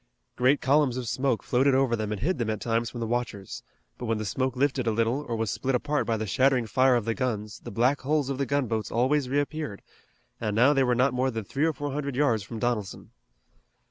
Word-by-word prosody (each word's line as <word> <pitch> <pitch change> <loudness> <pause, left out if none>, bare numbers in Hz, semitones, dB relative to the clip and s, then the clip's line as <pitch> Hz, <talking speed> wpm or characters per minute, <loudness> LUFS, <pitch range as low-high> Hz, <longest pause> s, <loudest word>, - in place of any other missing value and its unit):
Great 130 +3 +3
columns 135 -2 +3
of 125 -2 -4
smoke 130 0 0
floated 130 +2 +2
over 130 -3 +2
them 110 -2 -3
and 105 -2 -4
hid 175 +3 0
them 115 -2 -1
at 110 -2 -2
times 115 0 -1
from 120 - -8
the 115 - -2
watchers, 115 -4 -3 0.4
but 120 - -5
when 115 -1 +1
the 110 - -4
smoke 130 +5 -1
lifted 130 -2 0
a - - +3
little 115 +6 0
or 115 - -1
was 110 -2 -1
split 135 -1 -1
apart 145 +4 -1
by 115 -1 +1
the 110 - -3
shattering 130 +4 +2
fire 130 +3 +3
of 120 -3 0
the 115 - 0
guns 110 -5 -3
the - - -9
black 125 +7 +1
hulls 145 0 0
of 135 -1 -3
the 140 - 0
gunboats 120 -6 -1
always 130 +3 +1
reappeared, 145 -4 -2 0.6
and 105 -2 -2
now 130 +6 +5
they 135 - +2
were 125 -1 +2
not 130 +1 +2
more 130 +1 +1
than 115 -3 -4
three 140 +9 -1
or 165 - +2
four 145 +1 -4
hundred 140 -1 -3
yards 130 -6 +2
from 115 +3 -7
Donelson. 110 -4 -3
125 Hz, 235 wpm, -27 LUFS, 115-140 Hz, 0.6 s, now